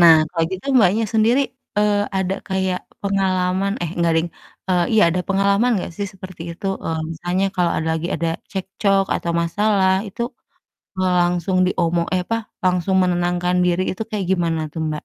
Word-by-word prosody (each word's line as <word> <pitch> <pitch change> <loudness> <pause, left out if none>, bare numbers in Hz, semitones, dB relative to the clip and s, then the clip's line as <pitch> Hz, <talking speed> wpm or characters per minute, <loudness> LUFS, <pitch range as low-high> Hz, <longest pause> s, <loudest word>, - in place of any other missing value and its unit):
nah 170 -2 +9 0.2
kalo 165 -2 0
gitu 190 +6 -6
Mbaknya 215 +1 +4
sendiri, 230 +5 +4 0.4
eee, 205 -1 +2
ada 190 0 0
kayak 190 -1 0 0.2
pengalaman 190 0 +1
eh, 165 - -2
enggak 170 -1 +2
deng 170 +1 -1 0.4
eee, 180 -2 +3
iya 220 - +5
ada 180 +2 0
pengalaman 200 +5 +3
gak - - -6
sih 205 - -2
seperti 185 -3 -10
itu? 190 +3 -7 0.2
Eee, 160 -1 -1
misalnya 175 +4 -1
kalo 175 -1 +3
ada 160 - -2
lagi 170 +2 -3
ada 165 - -1 0.2
cekcok 195 0 0
atau 170 - -2
masalah 195 +2 +2 0.2
itu, 235 - -5 0.8
eee, 185 -1 +2
langsung 175 +1 +1
diomong 170 -2 +1
eh, 180 - +1
apa, 230 - 0 0.3
langusung 185 +1 +1
menenangkan 180 0 +1
diri 180 +1 +2
itu 205 - -5
kayak 200 -4 -2
gimana 170 -3 +1
tuh, 160 - -5
Mbak? 155 -1 -1
185 Hz, 170 wpm, -21 LUFS, 175-195 Hz, 0.8 s, nah